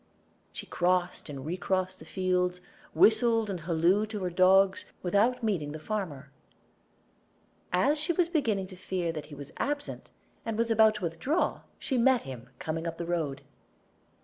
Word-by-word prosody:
She -, -, -7 dB
crossed 180 Hz, -2 st, 0 dB
and 140 Hz, -2 st, -7 dB
recrossed 185 Hz, +2 st, -1 dB
the -, -, -12 dB
fields, 180 Hz, -1 st, 0 dB, 0.4 s
whistled 225 Hz, -1 st, +4 dB
and 185 Hz, -, -4 dB
hallooed 175 Hz, +6 st, +2 dB
to 210 Hz, -3 st, -4 dB
her 180 Hz, -, -1 dB
dogs, 190 Hz, +2 st, +4 dB, 0.2 s
without 210 Hz, +7 st, +2 dB
meeting 165 Hz, -10 st, -1 dB
the -, -, -5 dB
farmer. 155 Hz, -8 st, -4 dB, 1.4 s
As 280 Hz, +12 st, +3 dB
she 310 Hz, +4 st, +1 dB
was 345 Hz, 0 st, +2 dB
beginning 230 Hz, -, 0 dB
to -, -, -9 dB
fear 180 Hz, -2 st, -2 dB
that 155 Hz, -3 st, -7 dB
he 145 Hz, -, -10 dB
was 140 Hz, 0 st, -10 dB
absent, 290 Hz, 0 st, -3 dB, 0.3 s
and 225 Hz, -2 st, -3 dB
was 230 Hz, 0 st, +1 dB
about 220 Hz, -1 st, +5 dB
to 215 Hz, -, -6 dB
withdraw, 175 Hz, -, 0 dB, 0.2 s
she 260 Hz, -3 st, -1 dB
met 255 Hz, 0 st, +4 dB
him 130 Hz, -2 st, -9 dB
coming 160 Hz, +4 st, -3 dB
up 165 Hz, 0 st, -4 dB
the 170 Hz, -, -4 dB
road. 160 Hz, -5 st, -2 dB
185 Hz, 160 wpm, -29 LUFS, 165-220 Hz, 1.4 s, about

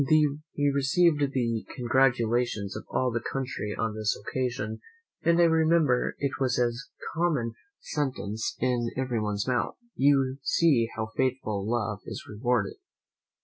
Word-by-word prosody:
They 150 Hz, -1 st, +2 dB
received 145 Hz, +1 st, +3 dB
the 115 Hz, -4 st, -1 dB
congratulations 120 Hz, -4 st, +1 dB
of -, -, -6 dB
all 130 Hz, -1 st, +1 dB
the 120 Hz, -, 0 dB
country 125 Hz, -6 st, -3 dB
on 110 Hz, 0 st, -1 dB
this 110 Hz, 0 st, -1 dB
occasion; 120 Hz, -4 st, -3 dB, 0.4 s
and 170 Hz, +1 st, +3 dB
I -, -, +7 dB
remember 160 Hz, -5 st, +3 dB
it 140 Hz, 0 st, -2 dB
was 130 Hz, -1 st, +1 dB
a 120 Hz, -1 st, +3 dB, 0.4 s
common 150 Hz, -9 st, 0 dB, 0.3 s
sentence 125 Hz, -7 st, -3 dB
in 120 Hz, -2 st, +1 dB
everyone's 110 Hz, -5 st, -1 dB
mouth, 125 Hz, -2 st, 0 dB, 0.2 s
"You 135 Hz, -1 st, +3 dB
see 135 Hz, -6 st, +3 dB
how 110 Hz, -1 st, -3 dB
faithful 110 Hz, -6 st, -1 dB
love 105 Hz, -4 st, -1 dB
is -, -, -6 dB
rewarded." 110 Hz, -1 st, 0 dB
125 Hz, 130 wpm, -28 LUFS, 115-140 Hz, 0.4 s, I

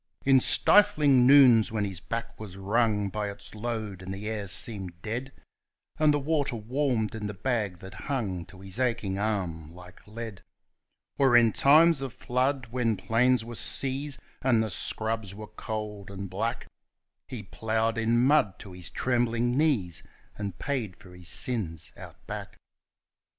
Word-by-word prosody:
In 135 Hz, -1 st, +6 dB
stifling 145 Hz, -6 st, +5 dB
noons 130 Hz, -6 st, +7 dB
when 105 Hz, -2 st, -1 dB
his 95 Hz, -4 st, -6 dB
back 115 Hz, +5 st, -5 dB
was 100 Hz, -4 st, -9 dB
wrung 105 Hz, 0 st, +1 dB
by 105 Hz, +1 st, -3 dB
its 100 Hz, 0 st, -8 dB
load, 110 Hz, -3 st, -4 dB
and 95 Hz, +1 st, -7 dB
the 100 Hz, +2 st, -5 dB
air 105 Hz, -2 st, -3 dB
seemed 95 Hz, -3 st, -1 dB
dead, 120 Hz, +5 st, -4 dB, 0.7 s
And 155 Hz, -1 st, +5 dB
the 145 Hz, -, +1 dB
water 145 Hz, -3 st, 0 dB
warmed 120 Hz, 0 st, -1 dB
in 110 Hz, -2 st, -4 dB
the 105 Hz, -, -6 dB
bag 105 Hz, -4 st, -1 dB
that 95 Hz, -, -10 dB, 0.2 s
hung 100 Hz, -11 st, -2 dB
to 95 Hz, -, -14 dB
his 95 Hz, +3 st, -5 dB
aching 115 Hz, -6 st, -1 dB
arm 90 Hz, -7 st, -2 dB
like 90 Hz, +2 st, -15 dB
lead, 110 Hz, -2 st, -7 dB, 0.8 s
Or 135 Hz, -3 st, +6 dB
in 115 Hz, -3 st, +4 dB
times 155 Hz, +1 st, +5 dB
of 135 Hz, -3 st, -5 dB
flood, 130 Hz, 0 st, -1 dB
when 115 Hz, -4 st, 0 dB
plains 115 Hz, +4 st, +2 dB
were 120 Hz, -, -8 dB
seas, 135 Hz, +4 st, -1 dB, 0.2 s
and 120 Hz, -4 st, +3 dB
the 110 Hz, -, -3 dB
scrubs 110 Hz, 0 st, -2 dB
were 105 Hz, +1 st, -8 dB
cold 105 Hz, -1 st, -6 dB
and 100 Hz, 0 st, -6 dB
black, 115 Hz, +5 st, -2 dB, 0.6 s
He -, -, -7 dB
ploughed 110 Hz, +1 st, -1 dB
in 115 Hz, +2 st, +2 dB
mud 135 Hz, -9 st, +3 dB
to 100 Hz, -, -11 dB
his 90 Hz, -1 st, -5 dB
trembling 120 Hz, -1 st, 0 dB
knees, 120 Hz, -, +1 dB, 0.3 s
and 100 Hz, -1 st, -5 dB
paid 125 Hz, -9 st, -3 dB
for 90 Hz, -3 st, -15 dB
his 90 Hz, -1 st, -9 dB
sins 85 Hz, -6 st, -1 dB
Out -, -, -13 dB
Back. -, -, -7 dB
110 Hz, 160 wpm, -28 LUFS, 100-125 Hz, 0.8 s, noons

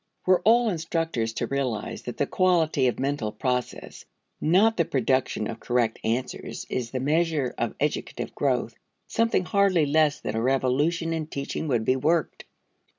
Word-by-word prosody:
Were 185 Hz, -1 st, +4 dB
all 235 Hz, +2 st, +5 dB
instructors 165 Hz, -, -1 dB
to 120 Hz, -, -2 dB
realize 130 Hz, -3 st, -3 dB
that 120 Hz, -, -7 dB
the 140 Hz, -, +1 dB
quality 160 Hz, -6 st, +2 dB
of 120 Hz, -, -1 dB
mental 135 Hz, -5 st, -1 dB
process, 125 Hz, 0 st, -3 dB, 0.4 s
not 200 Hz, +8 st, +4 dB
the 170 Hz, -, +2 dB
production 130 Hz, -6 st, 0 dB
of 115 Hz, -1 st, -6 dB
correct 120 Hz, -2 st, 0 dB
answers, 120 Hz, +3 st, -3 dB
is 120 Hz, -2 st, -2 dB
the 130 Hz, -, -3 dB
measure 150 Hz, -1 st, +1 dB
of -, -, -2 dB
educative -, -, -2 dB
growth -, -, 0 dB, 0.3 s
something 230 Hz, -5 st, +1 dB
hardly 195 Hz, -5 st, +3 dB
less 150 Hz, 0 st, +2 dB
than 105 Hz, -, -4 dB
a 110 Hz, -, 0 dB
revolution 135 Hz, +7 st, +1 dB
in 160 Hz, -2 st, -3 dB
teaching 140 Hz, +1 st, -4 dB
would 120 Hz, -5 st, 0 dB
be 130 Hz, -, +2 dB
worked. 160 Hz, +5 st, 0 dB
145 Hz, 155 wpm, -26 LUFS, 125-165 Hz, 0.4 s, all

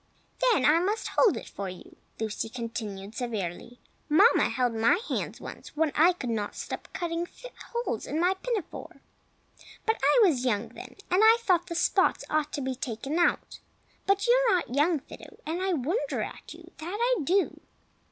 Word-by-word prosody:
"Then 325 Hz, -, +2 dB
I 310 Hz, +3 st, +6 dB
must 405 Hz, +5 st, -1 dB
hold 445 Hz, -, +3 dB
it -, -, -8 dB
for 200 Hz, -1 st, -5 dB
you!" 180 Hz, -, -11 dB, 0.2 s
Lucy 220 Hz, 0 st, -3 dB
continued, 220 Hz, -4 st, -6 dB
severely. 225 Hz, -1 st, -5 dB, 0.3 s
"Mamma 395 Hz, +11 st, +5 dB
held 245 Hz, 0 st, 0 dB
my 225 Hz, +10 st, +3 dB
hands -, -, -3 dB
once -, -, -10 dB
when 315 Hz, -1 st, +2 dB
I 340 Hz, +4 st, +5 dB
would 250 Hz, -, -4 dB
not 210 Hz, -2 st, -3 dB
stop -, -, -6 dB
cutting 340 Hz, -1 st, -3 dB, 0.4 s
holes 475 Hz, +1 st, -3 dB
in 310 Hz, -, -2 dB
my 360 Hz, +2 st, +3 dB
pinafore; 415 Hz, 0 st, -5 dB, 0.9 s
but 445 Hz, 0 st, 0 dB
I -, -, +5 dB
was 265 Hz, -8 st, +1 dB
young 230 Hz, -2 st, 0 dB
then, 245 Hz, -, -11 dB, 0.2 s
and 365 Hz, +3 st, +4 dB
I 445 Hz, +1 st, +7 dB
thought 360 Hz, -6 st, +2 dB
the 335 Hz, -, -5 dB
spots -, -, +2 dB
ought 305 Hz, -1 st, +1 dB
to 285 Hz, -, -2 dB
be 260 Hz, 0 st, -2 dB
taken 265 Hz, +5 st, -3 dB
out. 345 Hz, -, +1 dB, 0.5 s
But 395 Hz, 0 st, +2 dB
you 480 Hz, -, +5 dB, 0.2 s
are 390 Hz, -, +5 dB
not 335 Hz, -9 st, -2 dB
young, 295 Hz, +2 st, +2 dB
Fido, -, -, -13 dB
and 330 Hz, +4 st, -2 dB
I 380 Hz, 0 st, +1 dB
wonder 335 Hz, -, -1 dB
at -, -, -9 dB
you, -, -, -12 dB
that 350 Hz, +6 st, -4 dB
I 485 Hz, -4 st, +2 dB
do!" 375 Hz, +6 st, +1 dB
310 Hz, 180 wpm, -28 LUFS, 240-375 Hz, 0.9 s, I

